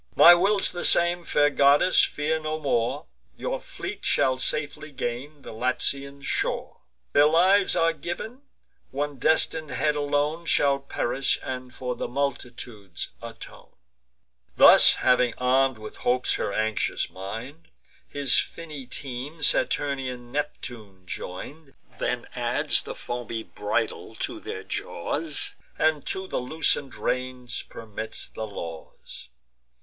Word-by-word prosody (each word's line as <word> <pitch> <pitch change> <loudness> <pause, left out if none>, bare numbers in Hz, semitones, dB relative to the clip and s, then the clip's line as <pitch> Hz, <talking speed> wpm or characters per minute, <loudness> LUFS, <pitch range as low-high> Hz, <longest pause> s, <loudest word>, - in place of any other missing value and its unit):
My 175 - +10
will's 195 +3 +3
the 175 - -5
same: 175 +1 +4
fair 145 -3 +3
goddess, 145 +6 +5
fear 155 +2 0
no 155 0 -3
more, 135 +1 0 0.3
Your - - -2
fleet - - -7
shall 130 -1 +2
safely 150 +2 -1
gain 135 +3 -5
the - - -8
Latian 135 +4 -1
shore; - - -2 0.4
Their 145 +1 +6
lives 185 +5 +4
are 165 -1 +3
giv'n; 175 - -6 0.5
one 145 0 -3
destin'd 160 +1 +2
head 150 +3 +1
alone 145 +3 0
Shall 140 -2 +3
perish, 135 -1 0
and 125 -1 -5
for 125 0 -4
multitudes 120 -8 -4
atone." - - -11 0.8
Thus - - +9
having 125 -2 +4
arm'd 130 0 +3
with 110 0 -9
hopes 125 +1 +1
her - - -1
anxious 110 +1 -1
mind, 115 - -7 0.4
His 140 -3 +3
finny 150 -6 -6
team 135 +4 -5
Saturnian 130 -6 0
Neptune 115 -9 -5
join'd, 135 - -8 0.2
Then - - -1
adds - - 0
the - - -7
foamy 120 -2 -4
bridle 105 -1 -3
to - - -3
their - - -6
jaws, 150 - -1 0.2
And 155 -2 +2
to 190 0 -2
the - - -2
loosen'd 140 0 -1
reins 125 -1 -2
permits 110 0 -6
the 110 - -6
laws. 85 -9 -9
140 Hz, 125 wpm, -26 LUFS, 125-155 Hz, 0.8 s, My